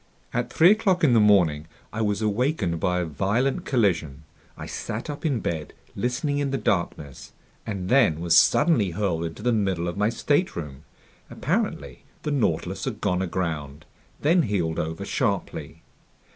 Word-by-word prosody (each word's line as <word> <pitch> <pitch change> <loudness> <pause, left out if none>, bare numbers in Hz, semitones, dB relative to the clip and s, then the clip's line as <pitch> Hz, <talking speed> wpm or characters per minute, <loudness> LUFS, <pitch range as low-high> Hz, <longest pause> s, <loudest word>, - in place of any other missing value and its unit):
At 120 0 -2
three 170 +4 +6
o'clock 200 -5 +2
in 135 -6 +5
the 115 - +5
morning, 85 -8 +3 0.3
I 115 - -2
was 105 0 0
awakened 105 - 0
by 90 +2 0
a - - -2
violent 115 - -1
collision. 85 - 0 0.3
I - - -7
sat 115 +7 -5
up 145 +3 -3
in 130 -7 -1
bed, 80 -3 -4 0.2
listening 140 - -1
in 140 -1 0
the 135 - -1
darkness, 85 - -3 0.3
and 95 -4 -4
then 105 - +4
was 85 -1 +2
suddenly 120 - +4
hurled 90 -6 0
into 80 +5 -7
the 125 - +2
middle 95 -5 0
of 85 - -4
my 105 +1 +2
stateroom. 85 - -1 0.4
Apparently - - -2 0.2
the 150 - -2
Nautilus 140 -6 -1
had - - -4
gone 90 0 0
aground, 80 -5 -3 0.4
then 170 +4 +4
heeled 90 - -1
over 80 +1 -3
sharply. - - -2
100 Hz, 160 wpm, -25 LUFS, 85-130 Hz, 0.4 s, three